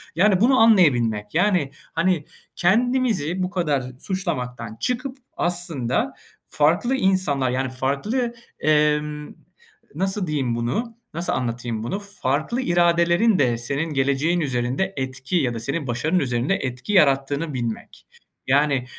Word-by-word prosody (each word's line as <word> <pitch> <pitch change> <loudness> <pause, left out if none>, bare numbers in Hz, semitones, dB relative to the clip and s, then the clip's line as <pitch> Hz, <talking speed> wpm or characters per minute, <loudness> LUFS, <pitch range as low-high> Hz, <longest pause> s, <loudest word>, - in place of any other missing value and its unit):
Yani 190 +2 +3
bunu 260 +3 +5
anlayabilmek. 120 - +4
Yani, 175 -6 +2 0.2
hani, 165 -2 +1 0.3
kendimizi 210 - +1
bu 180 - -1
kadar 155 -7 0 0.2
suçlamaktan 125 - -4
çıkıp 255 +2 -2 0.2
aslında 170 -8 -1 0.4
farklı 175 - +2
insanlar, 185 - +1
yani 130 +1 -1
farklı, 140 - -1 0.3
emm, 150 -1 +1 0.6
nasıl 190 0 -1
diyeyim 135 -6 -1
bunu? 125 - -2 0.2
Nasıl 170 +2 -1
anlatayım 120 -2 -3
bunu? 195 - -3
Farklı 200 - -2
iradelerin 175 +2 +3
de 120 -4 +2
senin 140 +7 -2
geleceğin 140 +5 +1
üzerinde 130 +7 -1
etki 130 +4 -3
ya 130 -6 +1
da 115 - -4
senin 140 +5 -2
başarının 150 +10 0
üzerinde 125 +5 0
etki 130 - -4
yarattığını 140 -2 +2
bilmek. 120 -3 -5 0.4
Yani 140 -1 +2
150 Hz, 120 wpm, -23 LUFS, 130-185 Hz, 0.6 s, bunu